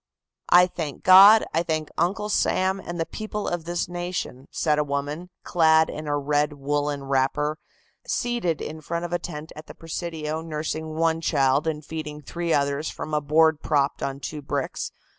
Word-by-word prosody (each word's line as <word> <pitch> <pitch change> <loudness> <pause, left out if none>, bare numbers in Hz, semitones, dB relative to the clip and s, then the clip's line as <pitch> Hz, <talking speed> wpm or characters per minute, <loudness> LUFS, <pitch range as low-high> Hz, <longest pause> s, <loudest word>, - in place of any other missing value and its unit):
"I 180 +1 +8
thank 160 -5 -6
God, 195 +4 +9
I 165 - +2
thank 155 -2 -2
Uncle 190 +5 0
Sam 190 -1 +1
and 175 -2 -6
the 165 - 0
people 210 +1 -5
of 175 -2 -3
this 175 +1 -2
nation," 175 -6 -5
said 150 -2 +1
a - - +3
woman, 145 +4 -4
clad 160 -2 +4
in 155 0 -7
a 145 0 0
red 145 +1 0
woolen 145 0 -2
wrapper, 140 +3 0 0.5
seated 235 -10 -1
in 155 +1 -6
front 170 +2 -3
of 175 - -5
a 175 - +1
tent 155 -2 -7
at 155 +1 -10
the - - -11
Presidio 160 -1 -4
nursing 155 0 -4
one 165 0 +1
child 140 -1 +2
and 155 -2 -3
feeding 155 -2 -6
three 170 +3 -4
others 140 +1 +1
from 155 - -7
a 150 - +2
board 155 +1 +3
propped 145 -3 0
on 135 0 -3
two 150 +2 -6
bricks. 140 -1 -3
155 Hz, 180 wpm, -24 LUFS, 145-170 Hz, 0.5 s, God